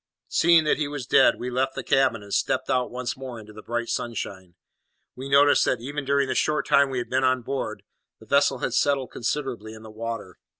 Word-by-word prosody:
Seeing 170 Hz, -1 st, +4 dB
that 155 Hz, -, +1 dB
he 150 Hz, -, 0 dB
was 145 Hz, -3 st, -5 dB
dead, -, -, +5 dB
we 125 Hz, +1 st, -4 dB
left 130 Hz, +2 st, -1 dB
the 135 Hz, -, -4 dB
cabin, 130 Hz, -4 st, +2 dB
and 100 Hz, -, -9 dB
stepped -, -, 0 dB
out 125 Hz, -1 st, +1 dB
once 125 Hz, 0 st, -4 dB
more 130 Hz, -3 st, -8 dB
into 105 Hz, -1 st, -13 dB
the 110 Hz, -, -11 dB
bright 120 Hz, +1 st, -3 dB
sunshine. 95 Hz, -7 st, -5 dB, 0.6 s
We 130 Hz, +2 st, -7 dB
noticed 140 Hz, +1 st, +5 dB
that, 125 Hz, -, 0 dB
even 140 Hz, +4 st, -5 dB
during 140 Hz, 0 st, +2 dB
the -, -, -1 dB
short 150 Hz, 0 st, 0 dB
time 140 Hz, -1 st, +4 dB
we 130 Hz, -, -3 dB
had 120 Hz, -, -3 dB
been 130 Hz, +1 st, +1 dB
on 130 Hz, -1 st, +2 dB
board, 135 Hz, +3 st, -4 dB, 0.4 s
the -, -, -15 dB
vessel 140 Hz, -1 st, +3 dB
had 125 Hz, -, -3 dB
settled 135 Hz, 0 st, +1 dB
considerably 120 Hz, -4 st, -4 dB
in 110 Hz, -, -13 dB
the 110 Hz, -, -11 dB
water. 110 Hz, -4 st, -6 dB
130 Hz, 220 wpm, -25 LUFS, 115-140 Hz, 0.6 s, dead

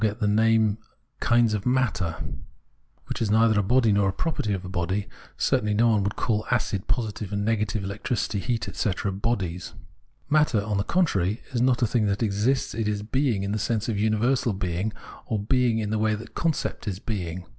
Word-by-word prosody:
246 110 Hz, 0 st, +2 dB, 0.4 s
Phenomenology 120 Hz, -2 st, +3 dB
of 100 Hz, -, -3 dB
Mind 120 Hz, -10 st, -1 dB, 0.7 s
which -, -, -5 dB
is 110 Hz, -, +1 dB
neither 110 Hz, 0 st, +4 dB
a -, -, +4 dB
body 115 Hz, +2 st, +3 dB
nor 100 Hz, -1 st, +3 dB
a -, -, +1 dB
property 110 Hz, -, -2 dB
of 95 Hz, -2 st, -2 dB
a -, -, -5 dB
body; 95 Hz, +3 st, -2 dB, 0.3 s
certainly 105 Hz, -1 st, +1 dB
no 115 Hz, +2 st, +4 dB
one 110 Hz, -2 st, +3 dB
would 100 Hz, +1 st, -1 dB
call 110 Hz, -2 st, 0 dB
acid, 105 Hz, -6 st, 0 dB
positive 105 Hz, -4 st, -2 dB
and 100 Hz, 0 st, -1 dB
nega 110 Hz, -1 st, +1 dB
tive 100 Hz, +1 st, -3 dB
electricity, 100 Hz, +1 st, -2 dB
heat,* 115 Hz, +2 st, -2 dB
etc., 100 Hz, -1 st, -1 dB
bodies. 95 Hz, -4 st, -2 dB, 0.5 s
Matter, 150 Hz, -8 st, +3 dB
on 105 Hz, -1 st, -1 dB
the 100 Hz, -, +1 dB
contrary, 105 Hz, -, +1 dB
is 120 Hz, -3 st, 0 dB
not 125 Hz, -1 st, +3 dB
a -, -, +6 dB
thing 110 Hz, -1 st, +1 dB
that 100 Hz, +3 st, 0 dB
exists, 110 Hz, +6 st, +1 dB
it 110 Hz, -1 st, -2 dB
is 105 Hz, -1 st, -1 dB
being 120 Hz, -3 st, 0 dB
in 100 Hz, -, -2 dB
the 105 Hz, -, -1 dB
sense 110 Hz, 0 st, -1 dB
of 110 Hz, -4 st, -1 dB
universal 110 Hz, +3 st, +2 dB
being, 95 Hz, +2 st, -2 dB, 0.4 s
or 110 Hz, -, 0 dB
being 120 Hz, +2 st, +2 dB
in 105 Hz, -2 st, -2 dB
the 110 Hz, -, 0 dB
way 110 Hz, 0 st, +2 dB
the 115 Hz, +2 st, -8 dB
concept 160 Hz, -8 st, -2 dB
is 95 Hz, -3 st, -2 dB
being. 90 Hz, -4 st, -4 dB
105 Hz, 195 wpm, -25 LUFS, 100-115 Hz, 0.7 s, a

